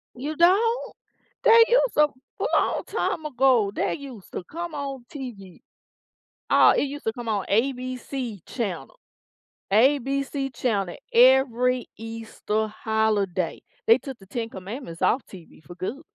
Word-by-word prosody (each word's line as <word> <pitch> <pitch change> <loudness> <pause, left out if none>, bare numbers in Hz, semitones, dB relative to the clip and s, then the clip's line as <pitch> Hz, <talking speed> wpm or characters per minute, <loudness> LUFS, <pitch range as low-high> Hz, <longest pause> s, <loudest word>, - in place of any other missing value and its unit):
You 290 +5 -4
don't? 420 +9 +3 0.5
They 460 -1 +8
use - - +3
to 300 0 +5 0.3
a - - -1
long - - +1
time 315 - -2
ago, 255 -7 +3
they - - -1
used 265 - -11
to - - -4
come 340 - -6
on 275 -3 -5
TV, 215 - -8 0.9
uh, - - +6
it - - +2
used 285 +1 -5
to 225 - +1
come 240 -2 -7
on 205 -3 0
ABC 255 -1 -2
channel, 225 - -5 0.7
ABC 270 +3 +2
channel 200 -7 -1 0.2
every 250 0 +4
Easter 225 -1 -3
holiday. 210 -5 -1 0.3
They 230 - +7
took 265 -2 -8
The 195 - -15
Ten 230 +2 -4
Commandments 190 -2 -8
off 250 - +2
TV 170 -4 -14
for 175 +5 -12
good. 205 +11 -5
245 Hz, 140 wpm, -25 LUFS, 215-275 Hz, 0.9 s, They